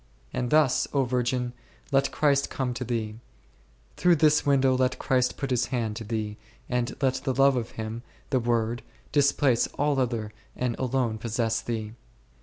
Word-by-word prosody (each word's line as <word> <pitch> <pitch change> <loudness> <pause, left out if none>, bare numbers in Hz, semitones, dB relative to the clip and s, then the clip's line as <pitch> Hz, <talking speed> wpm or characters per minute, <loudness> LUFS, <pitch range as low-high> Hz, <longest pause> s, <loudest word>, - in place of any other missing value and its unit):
And 125 - -1
thus, 150 -3 +3
O 140 -2 +3
virgin, 125 0 -1 0.4
let 135 0 +2
Christ 140 -2 +2
come 130 -2 -2
to 125 - -4
thee; 110 -3 -3 0.8
through 180 -1 +5
this 150 -1 +3
window 135 -2 +4
let 130 0 +1
Christ 125 -1 +1
put 135 -2 -3
His 125 -1 +1
hand 115 -4 -2
to 115 - -5
thee, 105 -1 -3 0.3
and 125 -1 -1
let 130 -1 +1
the 130 - -1
love 135 +1 +5
of 120 -2 -2
Him, 110 +1 -4 0.3
the 130 - +3
Word, 115 0 0 0.3
displace 140 -4 +3
all 145 -1 +1
other 115 -4 -1 0.2
and 125 -2 -1
alone 125 -4 0
possess 115 0 -1
thee. 110 -2 -4
125 Hz, 165 wpm, -27 LUFS, 115-135 Hz, 0.8 s, through